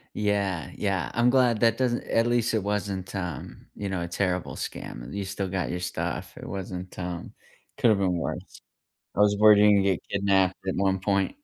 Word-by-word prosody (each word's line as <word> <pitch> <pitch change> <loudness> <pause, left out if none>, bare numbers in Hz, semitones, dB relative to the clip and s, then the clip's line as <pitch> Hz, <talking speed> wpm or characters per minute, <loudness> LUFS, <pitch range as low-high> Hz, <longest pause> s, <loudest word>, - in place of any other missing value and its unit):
Yeah, 100 -6 0
yeah. 100 -2 -1
I'm 120 +1 +4
glad 125 -4 +3
that 115 0 +3
doesn't 125 -2 +1
at 115 +1 +2
least 120 -1 +1
it 110 - +1
wasn't, 100 -2 -3
um, 90 -4 -5
you 100 -1 -4
know, 90 -2 -2
a 85 - -4
terrible 90 0 -1
scam, - - -6
and 65 - -9
you 100 -1 -2
still 95 0 -3
got 95 -2 -2
your 90 - -2
stuff, 90 - -3
it - - -8
wasn't, 95 -1 -6
um 90 -1 -5 0.5
could 115 - +4
have 105 - +3
been 90 -2 +1
worse. 85 - -5 0.6
I - - +1
was 105 0 +5
worried 105 -1 +8
you'd 105 0 +6
gonna 100 -1 +5
get 95 -3 +1
kidnapped 95 -2 +2
at 95 - 0
one 95 0 +2
point. 100 - 0
100 Hz, 205 wpm, -26 LUFS, 95-105 Hz, 0.6 s, worried